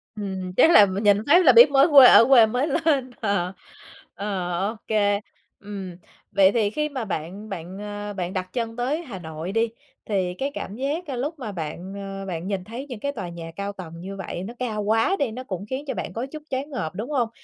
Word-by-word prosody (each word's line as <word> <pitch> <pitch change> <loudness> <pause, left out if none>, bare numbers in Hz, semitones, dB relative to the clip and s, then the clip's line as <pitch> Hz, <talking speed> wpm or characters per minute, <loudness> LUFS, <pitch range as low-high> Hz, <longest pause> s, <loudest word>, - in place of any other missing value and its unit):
Ừm, 190 -3 -5
chắc 330 - +6
là 210 -10 +8
mình 195 +2 -3
nhìn 205 -1 +5
phát 350 +4 +6
là 260 - +9
biết 240 +4 +8
mới 275 +3 +6
quê 275 -3 +10
ở 230 - +8
quê 245 -4 +7
mới 250 +7 -1
lên. 280 -4 +1
Ờ. 195 -3 0 0.6
Ờ, 190 -2 -3 0.2
OK. 210 -2 0 0.4
Ừm, 195 -3 -7 0.4
vậy 195 -1 +5
thì 215 -3 +1
khi 300 +5 -2
mà 260 -5 -4
bạn 195 +5 -5
bạn, 185 +2 -7
à, 205 0 -6
bạn 180 -1 -4
đặt 185 -1 -4
chân 230 -2 -3
tới 270 +7 -1
Hà 210 - -8
Nội 160 +2 -6
đi, 225 +1 +1 0.4
thì 185 -4 -1
cái 275 +8 -3
cảm 205 -8 -6
giá 285 +2 -3
lúc 290 +5 -4
mà 220 -5 -5
bạn, 175 +2 -6
ờ, 195 -1 -6
bạn 175 0 -4
nhìn 195 -3 -2
thấy 235 +7 -7
những 240 -4 -6
cái 280 +4 -2
tòa 190 -10 -6
nhà 165 -1 -8
cao 200 0 -4
tầng 180 -4 -9
như 195 +2 -7
vậy 185 -1 -6
nó 230 +5 -7
cao 220 -4 -2
quá 225 - +2
đi, 265 -6 0
nó 255 +3 -7
cũng 195 -4 -5
khiến 265 +3 -4
cho 265 - -2
bạn - - -5
có 235 +3 -3
chút 305 -1 -8
choáng 270 +3 -3
ngợp, 195 - -4
đúng 225 +8 -5
hông? 245 -5 +1
210 Hz, 225 wpm, -24 LUFS, 190-255 Hz, 0.6 s, quê